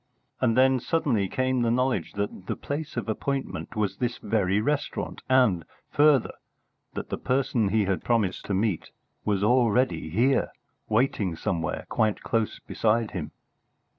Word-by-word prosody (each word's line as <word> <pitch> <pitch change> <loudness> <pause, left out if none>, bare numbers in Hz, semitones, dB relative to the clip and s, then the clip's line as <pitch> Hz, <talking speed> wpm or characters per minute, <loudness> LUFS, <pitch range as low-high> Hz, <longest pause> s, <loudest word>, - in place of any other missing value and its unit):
And 120 -2 +2
then 130 0 +5
suddenly 120 -8 +1
came 130 +2 0
the 120 - +2
knowledge 120 -8 0
that 100 -2 -4
the - - -1
place 145 -2 -5
of 120 - -2
appointment 135 +1 -3
was 100 -3 -1
this 120 -1 -1
very 100 -2 +1
restaurant, 145 +6 -2
and, 125 -10 +4 0.3
further, 145 -4 +4 0.6
that - - -5
the - - -3
person 125 -5 +1
he 105 0 +2
had 95 -4 -1
promised 110 -6 0
to 100 - -1
meet 100 -3 -1 0.4
was 100 -2 +1
already 120 -3 +2
here, 120 - +2 0.4
waiting 105 -6 +1
somewhere 80 -1 -2
quite 110 -2 0
close 115 -2 -1
beside 115 0 0
him. 80 -6 -4
115 Hz, 145 wpm, -26 LUFS, 100-130 Hz, 0.6 s, then